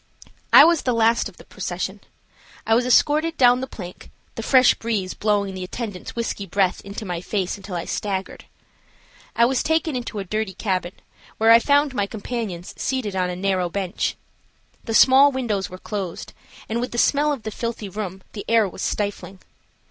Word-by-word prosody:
I -, -, +10 dB
was 335 Hz, -2 st, +4 dB
the 250 Hz, -2 st, 0 dB
last 230 Hz, -1 st, +2 dB
of 185 Hz, -, -20 dB
the -, -, -13 dB
procession. 190 Hz, +1 st, -5 dB, 0.7 s
I 225 Hz, -, +2 dB
was 245 Hz, +2 st, +2 dB
escorted 310 Hz, +5 st, +3 dB
down 250 Hz, -1 st, +5 dB
the 260 Hz, -, -4 dB
plank, 180 Hz, -8 st, -10 dB, 0.2 s
the -, -, -5 dB
fresh 255 Hz, +2 st, +5 dB
breeze 210 Hz, -5 st, -3 dB
blowing 205 Hz, -2 st, 0 dB
the 185 Hz, 0 st, -5 dB
attendants' 200 Hz, 0 st, -6 dB
whisky 230 Hz, -4 st, -3 dB
breath 190 Hz, 0 st, +1 dB
into 200 Hz, +2 st, -7 dB
my 175 Hz, -3 st, -4 dB
face 190 Hz, -1 st, -2 dB
until 195 Hz, -2 st, -8 dB
I 170 Hz, -, -3 dB
staggered. 195 Hz, -2 st, -4 dB, 0.9 s
I 235 Hz, -, +5 dB
was 260 Hz, +1 st, +1 dB
taken 320 Hz, -2 st, 0 dB
into 240 Hz, -3 st, -4 dB
a 200 Hz, -, -2 dB
dirty 210 Hz, 0 st, -3 dB
cabin, 185 Hz, -3 st, -2 dB, 0.4 s
where 225 Hz, +1 st, +5 dB
I 230 Hz, -, +9 dB
found 285 Hz, +2 st, +2 dB
my 205 Hz, -5 st, -1 dB
companions 205 Hz, -5 st, -5 dB
seated 250 Hz, -7 st, -2 dB
on 180 Hz, -1 st, 0 dB
a 180 Hz, -, -4 dB
narrow 185 Hz, -1 st, 0 dB
bench. 185 Hz, 0 st, -2 dB, 0.7 s
The 225 Hz, -, -2 dB
small 270 Hz, +4 st, +7 dB
windows 220 Hz, -8 st, -2 dB
were 185 Hz, -, -9 dB
closed, 190 Hz, -3 st, -6 dB, 0.3 s
and, 230 Hz, +2 st, -2 dB
with 250 Hz, -, -4 dB
the -, -, -4 dB
smell 295 Hz, +4 st, +3 dB
of 270 Hz, -6 st, -4 dB
the 215 Hz, -, -4 dB
filthy 230 Hz, -1 st, -4 dB
room, 190 Hz, -1 st, -6 dB
the 205 Hz, -, -6 dB
air 225 Hz, -2 st, +4 dB
was 185 Hz, -, -9 dB
stifling. 200 Hz, -2 st, -3 dB
210 Hz, 185 wpm, -22 LUFS, 190-245 Hz, 0.9 s, I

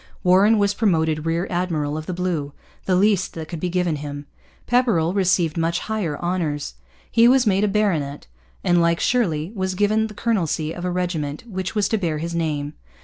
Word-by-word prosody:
Warren 195 Hz, +5 st, +5 dB
was 200 Hz, -1 st, +2 dB
promoted 160 Hz, -7 st, +1 dB
rear 165 Hz, +2 st, 0 dB
admiral 165 Hz, -5 st, -1 dB
of 155 Hz, 0 st, -5 dB
the 185 Hz, -, -3 dB
blue, 170 Hz, -6 st, -2 dB, 0.3 s
the 185 Hz, -, +2 dB
least 195 Hz, 0 st, +2 dB
that 160 Hz, -1 st, -6 dB
could 170 Hz, -1 st, -6 dB
be 180 Hz, -, -2 dB
given 175 Hz, -3 st, 0 dB
him. 145 Hz, 0 st, -6 dB, 0.4 s
Pepperrell 225 Hz, -10 st, +2 dB
received 180 Hz, -4 st, +1 dB
much 165 Hz, +1 st, +1 dB
higher 200 Hz, -9 st, -2 dB
honours. 165 Hz, -, -2 dB, 0.4 s
He 230 Hz, +1 st, +5 dB
was 255 Hz, 0 st, +5 dB
made 200 Hz, -1 st, +2 dB
a -, -, +3 dB
baronet 175 Hz, -9 st, 0 dB, 0.4 s
and, 175 Hz, -1 st, +3 dB
like 170 Hz, 0 st, +2 dB
Shirley, 175 Hz, -9 st, 0 dB
was 190 Hz, -3 st, -2 dB
given 215 Hz, +3 st, +2 dB
the 210 Hz, -, -12 dB
colonelcy 165 Hz, -9 st, -1 dB
of 175 Hz, -, -6 dB
a -, -, 0 dB
regiment 165 Hz, -5 st, -2 dB
which 190 Hz, -3 st, -5 dB
was 210 Hz, -2 st, +2 dB
to 220 Hz, -, +1 dB
bear 165 Hz, -5 st, -1 dB
his 170 Hz, +2 st, -4 dB
name. 150 Hz, -3 st, -2 dB
175 Hz, 190 wpm, -22 LUFS, 160-200 Hz, 0.4 s, Warren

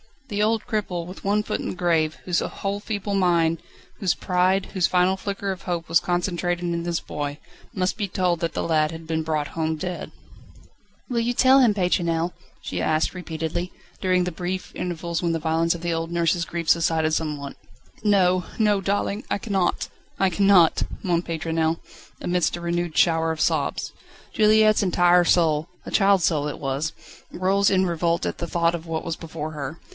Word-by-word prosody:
The 205 Hz, -1 st, -1 dB
old 220 Hz, +1 st, +1 dB
cripple, 200 Hz, -7 st, -2 dB
with 185 Hz, +3 st, -10 dB
one 205 Hz, +1 st, +2 dB
foot -, -, -2 dB
in -, -, -4 dB
the -, -, -4 dB
grave, 165 Hz, -3 st, +1 dB
whose 175 Hz, -2 st, +1 dB
whole 200 Hz, +1 st, -3 dB
feeble 205 Hz, -1 st, -3 dB
mind, 170 Hz, -4 st, +2 dB, 0.4 s
whose 190 Hz, -4 st, +1 dB
pride, 185 Hz, +1 st, +1 dB
whose 185 Hz, -3 st, +1 dB
final 185 Hz, +1 st, +2 dB
flicker 200 Hz, 0 st, -3 dB
of 190 Hz, 0 st, -7 dB
hope 170 Hz, -3 st, -3 dB
was 165 Hz, -1 st, +5 dB
concentrated 175 Hz, 0 st, -1 dB
in 170 Hz, -1 st, -2 dB
his 170 Hz, -1 st, -1 dB
boy, 145 Hz, -1 st, -4 dB, 0.4 s
must 185 Hz, 0 st, -1 dB
be 205 Hz, -2 st, -1 dB
told 180 Hz, -2 st, 0 dB
that 165 Hz, 0 st, -2 dB
the -, -, -2 dB
lad 155 Hz, -1 st, +2 dB
had 165 Hz, 0 st, -8 dB
been 160 Hz, 0 st, -1 dB
brought 155 Hz, -2 st, -1 dB
home 160 Hz, -1 st, -1 dB
dead. 180 Hz, +3 st, -5 dB, 1.0 s
"Will 240 Hz, -2 st, 0 dB
you 235 Hz, +1 st, 0 dB
tell 260 Hz, +2 st, +6 dB
him, 240 Hz, -5 st, +5 dB
Pétronelle?" 175 Hz, -3 st, 0 dB, 0.3 s
she -, -, -4 dB
asked 155 Hz, 0 st, +1 dB
repeatedly, 175 Hz, 0 st, -4 dB, 0.3 s
during 185 Hz, -1 st, +2 dB
the 180 Hz, -, -2 dB
brief 180 Hz, +2 st, -4 dB
intervals 170 Hz, -1 st, -3 dB
when 170 Hz, -2 st, 0 dB
the -, -, +1 dB
violence 165 Hz, +1 st, +1 dB
of 170 Hz, -, -8 dB
the 170 Hz, -1 st, -1 dB
old 165 Hz, +1 st, -3 dB
nurse's 170 Hz, 0 st, +1 dB
grief 170 Hz, -1 st, -4 dB
subsided 160 Hz, -1 st, +2 dB
somewhat. 150 Hz, -3 st, -3 dB, 0.4 s
"No 185 Hz, -3 st, +3 dB
no 210 Hz, -2 st, +3 dB
darling, 200 Hz, +2 st, -1 dB
I -, -, +1 dB
cannot 195 Hz, -4 st, -1 dB, 0.3 s
I 195 Hz, -, +3 dB
cannot 190 Hz, -2 st, +4 dB
" -, -, -10 dB
moaned 175 Hz, -3 st, 0 dB
Pétronelle, 160 Hz, 0 st, -1 dB, 0.4 s
amidst 175 Hz, -2 st, +1 dB
a 175 Hz, -, -7 dB
renewed 170 Hz, -1 st, -2 dB
shower 165 Hz, -1 st, +3 dB
of 155 Hz, -, -5 dB
sobs. -, -, 0 dB, 0.4 s
Juliette's 215 Hz, 0 st, +5 dB
entire 175 Hz, -2 st, +4 dB
soul 160 Hz, -2 st, +3 dB, 0.2 s
a -, -, -7 dB
child's 195 Hz, -2 st, +4 dB
soul 150 Hz, -3 st, +1 dB
it 150 Hz, -, -4 dB
was 140 Hz, +3 st, -2 dB, 0.4 s
rose 195 Hz, +2 st, +2 dB
in 190 Hz, -1 st, +3 dB
revolt 170 Hz, -1 st, 0 dB
at -, -, -3 dB
thought 170 Hz, 0 st, 0 dB
of 170 Hz, -1 st, -5 dB
what 160 Hz, -1 st, -3 dB
was 165 Hz, -1 st, -3 dB
before 155 Hz, -2 st, -6 dB
her. 150 Hz, +1 st, -5 dB
175 Hz, 185 wpm, -24 LUFS, 165-190 Hz, 1.0 s, tell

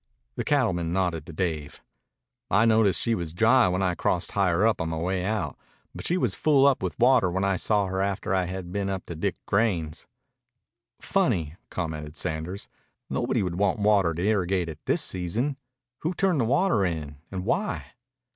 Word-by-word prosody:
The -, -, -2 dB
cattleman 95 Hz, -, +1 dB
nodded 90 Hz, -5 st, -1 dB
to -, -, -7 dB
Dave. 80 Hz, -3 st, -3 dB, 0.7 s
"I 105 Hz, +5 st, +4 dB
noticed 110 Hz, -5 st, +3 dB
she 115 Hz, -, +1 dB
was 85 Hz, -5 st, -4 dB
dry 115 Hz, +5 st, +5 dB
when 90 Hz, +1 st, 0 dB
I 90 Hz, -1 st, +1 dB
crossed 90 Hz, +1 st, 0 dB
higher 95 Hz, 0 st, +2 dB
up 110 Hz, -5 st, +2 dB
on 80 Hz, -, -2 dB
my 80 Hz, -, -3 dB
way 90 Hz, +2 st, -1 dB
out. 105 Hz, +2 st, -2 dB, 0.4 s
But -, -, -5 dB
she 180 Hz, -, +2 dB
was 125 Hz, -, +1 dB
full 140 Hz, +1 st, +3 dB
up 140 Hz, -2 st, +4 dB
with -, -, -3 dB
water 125 Hz, -5 st, +4 dB
when 95 Hz, +2 st, -1 dB
I 100 Hz, -1 st, +2 dB
saw 105 Hz, +2 st, +1 dB
her 95 Hz, 0 st, -2 dB
after 100 Hz, -1 st, -1 dB
I 95 Hz, -1 st, +2 dB
had 90 Hz, -1 st, -6 dB
been 100 Hz, 0 st, -2 dB
up 95 Hz, -2 st, -4 dB
to 85 Hz, -, -7 dB
Dick 80 Hz, -, -1 dB
Grein's." 95 Hz, -8 st, 0 dB, 0.9 s
"Funny," 80 Hz, -3 st, 0 dB
commented 80 Hz, -3 st, -5 dB
Sanders. 80 Hz, +6 st, -4 dB, 0.4 s
"Nobody -, -, 0 dB
would 90 Hz, -1 st, -3 dB
want 100 Hz, -1 st, +2 dB
water 100 Hz, -5 st, +3 dB
to 85 Hz, -, -3 dB
irrigate 95 Hz, -4 st, +1 dB
at 80 Hz, -, -9 dB
this -, -, +3 dB
season. 105 Hz, +11 st, -1 dB, 0.4 s
Who 170 Hz, +3 st, -2 dB
turned 185 Hz, -8 st, +2 dB
the -, -, +1 dB
water 140 Hz, -, +2 dB
in? 80 Hz, -5 st, -3 dB
And 95 Hz, -1 st, -5 dB
why?" 195 Hz, -, -2 dB
95 Hz, 185 wpm, -26 LUFS, 85-110 Hz, 0.9 s, dry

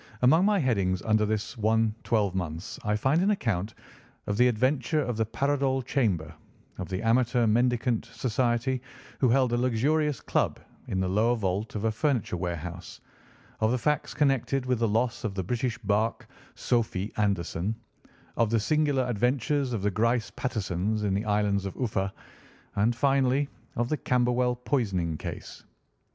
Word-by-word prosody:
Among 160 Hz, +9 st, +5 dB
my 210 Hz, 0 st, +3 dB
headings 100 Hz, -, +1 dB
under 110 Hz, -1 st, +2 dB
this 105 Hz, +3 st, -2 dB
one 110 Hz, 0 st, +2 dB
twelve 105 Hz, -5 st, +1 dB
months 85 Hz, -2 st, -4 dB
I 105 Hz, 0 st, +1 dB
find 135 Hz, +10 st, +2 dB
an 195 Hz, -, +2 dB
account 110 Hz, -, -1 dB, 0.5 s
of 105 Hz, -, -1 dB
the 125 Hz, +1 st, +5 dB
adventure 130 Hz, +5 st, +1 dB
of 125 Hz, -4 st, -2 dB
the 110 Hz, 0 st, 0 dB
Paradol 135 Hz, +2 st, 0 dB
Chamber, 100 Hz, -, 0 dB, 0.5 s
of 90 Hz, -3 st, -5 dB
the 95 Hz, +3 st, -3 dB
Amateur 120 Hz, +1 st, +3 dB
Mendicant 120 Hz, +1 st, +1 dB
Society, 125 Hz, +1 st, -1 dB, 0.4 s
who 130 Hz, -, +3 dB
held 125 Hz, 0 st, +3 dB
a -, -, +2 dB
luxurious 135 Hz, +4 st, +1 dB
club -, -, 0 dB, 0.3 s
in 95 Hz, -, -2 dB
the 95 Hz, -, 0 dB
lower 110 Hz, +6 st, +2 dB
vault 100 Hz, 0 st, -2 dB
of 105 Hz, -, -3 dB
a 110 Hz, -, +2 dB
furniture 120 Hz, -, 0 dB
warehouse, 85 Hz, 0 st, -5 dB, 0.6 s
of 110 Hz, -, +2 dB
the 125 Hz, -, +1 dB
facts 150 Hz, +5 st, -1 dB
connected 135 Hz, -2 st, +1 dB
with 125 Hz, -2 st, 0 dB
the 115 Hz, -, +2 dB
loss 115 Hz, +3 st, 0 dB
of 105 Hz, -4 st, -3 dB
the 95 Hz, -, -2 dB
British 120 Hz, +5 st, -2 dB
barque 110 Hz, 0 st, -1 dB, 0.3 s
Sophy 110 Hz, -4 st, -1 dB
Anderson, 100 Hz, 0 st, 0 dB, 0.6 s
of 115 Hz, -2 st, +3 dB
the 115 Hz, 0 st, +2 dB
singular 145 Hz, +3 st, +2 dB
adventures 125 Hz, +4 st, 0 dB
of 110 Hz, -5 st, -2 dB
the 105 Hz, -, +2 dB
Grice 115 Hz, +3 st, +1 dB
Patersons 105 Hz, -3 st, -2 dB
in 100 Hz, -2 st, +1 dB
the 100 Hz, +4 st, -1 dB
island 105 Hz, -1 st, +1 dB
of 95 Hz, -, -5 dB
Uffa, 100 Hz, -6 st, -1 dB, 0.6 s
and 110 Hz, +4 st, +2 dB
finally 135 Hz, +1 st, +2 dB, 0.3 s
of 120 Hz, 0 st, 0 dB
the 155 Hz, -, 0 dB
Camberwell 125 Hz, -1 st, +1 dB
poisoning 100 Hz, -, -1 dB
case. -, -, -7 dB
115 Hz, 160 wpm, -27 LUFS, 105-130 Hz, 0.6 s, Among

